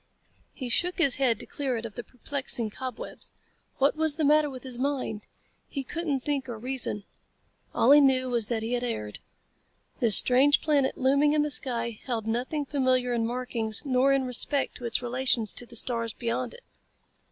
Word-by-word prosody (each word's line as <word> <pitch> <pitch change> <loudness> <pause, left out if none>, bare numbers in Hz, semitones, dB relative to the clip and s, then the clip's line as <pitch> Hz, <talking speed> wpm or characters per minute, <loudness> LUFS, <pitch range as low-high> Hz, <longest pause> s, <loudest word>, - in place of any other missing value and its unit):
He 260 - -5
shook 350 +10 +1
his 280 -8 +4
head 250 -5 +2
to - - -4
clear 265 -4 -3
it 225 - -5
of 220 - -7
the 240 - -6
perplexing 250 -3 -5
cobwebs. 255 +1 -5 0.4
What 275 +3 +2
was 315 -2 0
the 310 -1 0
matter 300 +1 +4
with 260 -2 -9
his 255 -2 -2
mind? 255 -6 -2 0.4
He 275 - -4
couldn't 300 -1 -2
think 275 -1 -2
or 235 - -5
reason. 240 -3 -3 0.7
All 245 - +4
he 295 +1 +8
knew 260 -2 +3
was 235 -4 +1
that 225 -2 -2
he 230 +2 -2
had 245 0 0
erred. 105 - -4 0.8
This 225 -4 +9
strange 270 +4 +5
planet 285 -4 +1
looming 280 +3 +3
in 300 -1 +3
the 300 - -2
sky 235 -4 -3
held 230 -4 -3
nothing 250 +7 -2
familiar 255 -3 +1
in 230 -1 0
markings 240 -1 -3
nor 265 0 +3
in 275 -1 +2
respect 265 +3 0
to 245 - -8
its 235 +1 -1
relations 245 -3 +1
to 245 - -3
the 235 - -10
stars 230 -1 0
beyond 235 - -3
it. 485 - -15
255 Hz, 185 wpm, -27 LUFS, 235-280 Hz, 0.8 s, This